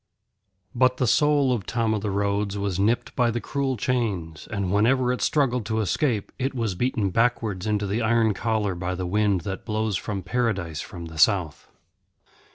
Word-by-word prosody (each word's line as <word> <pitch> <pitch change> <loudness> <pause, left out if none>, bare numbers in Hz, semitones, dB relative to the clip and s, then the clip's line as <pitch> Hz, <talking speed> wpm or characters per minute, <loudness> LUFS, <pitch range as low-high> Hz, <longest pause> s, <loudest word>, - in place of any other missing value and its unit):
But 130 +1 +3
the 130 - +1
soul 145 +1 +3
of 105 -6 -4
Tom 115 -2 0
o' 110 - 0
the 105 +1 -3
Roads 100 0 -1
was 100 -2 -2
nipped 110 +4 0
by 120 -2 +3
the 120 +1 -1
cruel 135 0 -2
chains, 100 - -2
and 100 -4 -2
whenever 125 +5 +3
it 125 - -4
struggled 125 -5 +1
to 110 0 0
escape 110 - 0
it 135 +1 -1
was 115 -5 -1
beaten 110 0 0
backwards 115 -4 0
into 105 -1 0
the 105 +4 -1
iron 110 -1 +3
collar 110 -2 -1
by 90 +1 -3
the 90 0 -3
wind 100 0 +1
that 95 +2 -5
blows 110 -3 -1
from 100 -1 -4
Paradise 95 -7 -1
from 90 -7 -8
the 80 -1 -9
south. 85 -3 +2
110 Hz, 180 wpm, -25 LUFS, 95-120 Hz, -, But